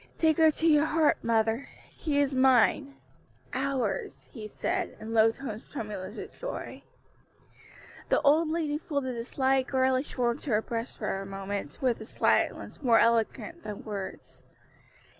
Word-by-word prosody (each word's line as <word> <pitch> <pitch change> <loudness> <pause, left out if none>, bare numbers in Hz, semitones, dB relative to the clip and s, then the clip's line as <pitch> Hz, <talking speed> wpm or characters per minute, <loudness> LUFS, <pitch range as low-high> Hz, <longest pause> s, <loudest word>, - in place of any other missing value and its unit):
"Take 315 -2 +3
her 320 -1 +6
to 315 +2 0
your 300 -1 +5
heart, 310 -1 +2
mother; 225 +2 +1 0.2
she 300 -3 -2
is 285 -1 +2
mine 265 +2 +3 0.6
ours!" 275 - -2
he 220 -6 -7
said, - - -3
in 220 +1 -6
low 225 0 +5
tones 225 -3 -8
tremulous 210 -5 -6
with - - -8
joy. - - -6 1.3
The - - +4
old 310 +3 +4
lady 310 -2 -1
folded 280 -6 -3
the 230 - -4
slight 265 0 +1
girlish 260 +1 +1
form 240 -1 0
to 295 - -8
her 215 -2 +3
breast 230 +1 -4
for 210 -3 -2
a - - -7
moment, 195 -5 -5
with 245 -4 +1
a - - -7
silence - - 0
more 240 -5 +5
eloquent 230 +9 +1
than 210 -1 -7
words. 200 -3 -7
255 Hz, 155 wpm, -28 LUFS, 220-290 Hz, 1.3 s, her